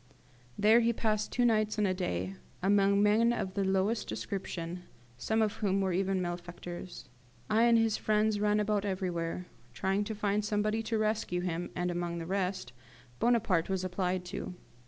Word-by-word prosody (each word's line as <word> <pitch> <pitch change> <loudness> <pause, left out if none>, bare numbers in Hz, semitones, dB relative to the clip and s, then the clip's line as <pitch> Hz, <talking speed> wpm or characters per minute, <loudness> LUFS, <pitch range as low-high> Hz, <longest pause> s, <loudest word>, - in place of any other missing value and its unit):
There 215 +3 +6
he 235 0 +2
passed 215 -1 -1
two 245 - +2
nights 215 -2 +2
and 210 - +2
a 185 - +2
day, 95 - -2 0.3
among 200 +1 +4
men 220 +3 +4
of 190 -5 -2
the 200 - 0
lowest 195 +4 0
description, 180 -3 -4 0.3
some 220 - +1
of 215 -1 -1
whom 195 -2 +1
were 190 -2 0
even 190 0 0
malefactors. 175 -3 -7 0.4
I 225 +2 +5
and 235 -1 +5
his 225 -1 +2
friends 215 0 +1
ran 210 0 +2
about 210 -1 +1
everywhere, 180 -3 -2 0.3
trying 195 +6 0
to 220 - -4
find 210 0 0
somebody 210 +1 0
to 225 0 -1
rescue 215 -4 0
him, 175 -1 -3
and, 180 0 -1
among 175 0 -2
the 165 - -5
rest, 185 -7 -2 0.5
Bonaparte 225 -9 +2
was 190 -1 -1
applied 180 0 -1
to. 180 0 -6
195 Hz, 170 wpm, -31 LUFS, 180-215 Hz, 0.5 s, There